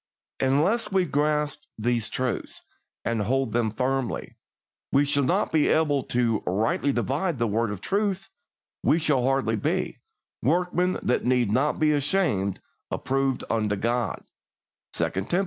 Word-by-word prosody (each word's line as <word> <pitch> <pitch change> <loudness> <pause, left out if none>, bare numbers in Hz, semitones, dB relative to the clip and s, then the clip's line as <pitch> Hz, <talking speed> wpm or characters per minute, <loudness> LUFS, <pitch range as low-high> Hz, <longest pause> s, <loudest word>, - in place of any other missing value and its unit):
Unless 155 - +2
we 190 -1 +3
grasp 150 0 0 0.2
these 115 -1 0
truths, 130 +2 -3 0.4
and 115 -2 0
hold 130 +3 0
them 115 0 +1
firmly, 130 +3 -2 0.6
we 140 +1 +4
shall 145 0 +1
not 130 - +1
be 155 -2 +3
able 150 -3 +2
to 115 -3 +1
"rightly 110 +8 +1
divide 140 +7 -1
the 120 - +1
word 115 +1 0
of 100 -2 -5
truth," 195 - -1 0.5
we - - +3
shall 150 -6 +2
hardly 130 -4 +1
be - - -1 0.4
"workmen 180 +5 +1
that 125 - +1
need 125 -4 +2
not 135 +6 +2
be 155 -1 +3
ashamed, 140 - +1 0.3
approved 135 -1 -1
unto 105 -2 0
God" 120 +3 -1 0.7
(2 - - 0 0.2
Tim. 175 - +2
135 Hz, 140 wpm, -26 LUFS, 115-150 Hz, 0.7 s, we